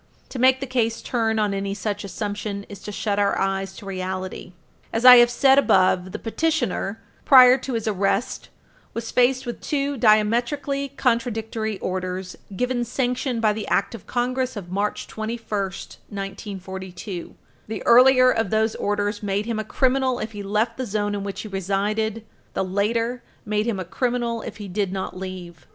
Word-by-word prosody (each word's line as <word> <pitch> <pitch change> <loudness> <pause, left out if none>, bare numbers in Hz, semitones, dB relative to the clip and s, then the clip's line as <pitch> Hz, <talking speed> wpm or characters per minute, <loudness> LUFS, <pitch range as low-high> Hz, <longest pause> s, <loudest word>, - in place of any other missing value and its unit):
To 255 - -6
make 260 +1 +4
the - - -1
case 235 -3 0
turn 225 -2 0
on 210 -2 +1
any 195 0 -2
such 205 +1 -3
assumption 205 0 -4
is 200 -2 -10
to 210 - -7
shut 205 0 -1
our 200 -1 +2
eyes 195 0 -1
to 210 - -11
reality. 185 -1 -5 0.4
As 230 +2 -1
I 250 -1 +12
have 240 0 +7
said 270 +3 +5
above, 185 -6 +3
the - - -4
petitioner, 245 -6 -1 0.2
prior 255 -2 +8
to 260 0 -5
his 225 -1 -2
arrest, 200 +2 -1 0.5
was 230 0 -4
faced 255 +1 +3
with 240 - -6
two 285 -1 -1
diametrically 240 +6 +2
contradictory 225 -3 -1
orders 185 0 -3 0.2
given 250 +3 0
sanction 250 +1 -1
by 215 -2 +3
the 215 0 -5
Act 200 - +1
of 230 - -10
Congress 255 +1 -1
of 185 -4 -7
March 205 +2 -1
21, 220 +2 -4 0.2
1942. 190 -2 -7 0.3
The 215 -3 -5
earlier 255 +1 +7
of 225 -4 0
those 220 +1 +1
orders 205 0 -1
made 205 0 -1
him 230 -2 -2
a - - -1
criminal 260 +3 +1
if 220 -1 -4
he 205 -2 -7
left 210 +3 -1
the 260 - -2
zone 205 0 -1
in 200 -1 -3
which 200 -1 -5
he - - -7
resided; 205 +3 -1 0.3
the - - +1
later 230 +6 -1 0.2
made 210 +1 0
him 215 -5 -1
a 185 - -4
criminal 240 +3 -1
if - - -8
he 205 -2 -7
did 195 0 -1
not 190 0 -4
leave. 180 -5 -8
215 Hz, 170 wpm, -23 LUFS, 195-245 Hz, 0.5 s, I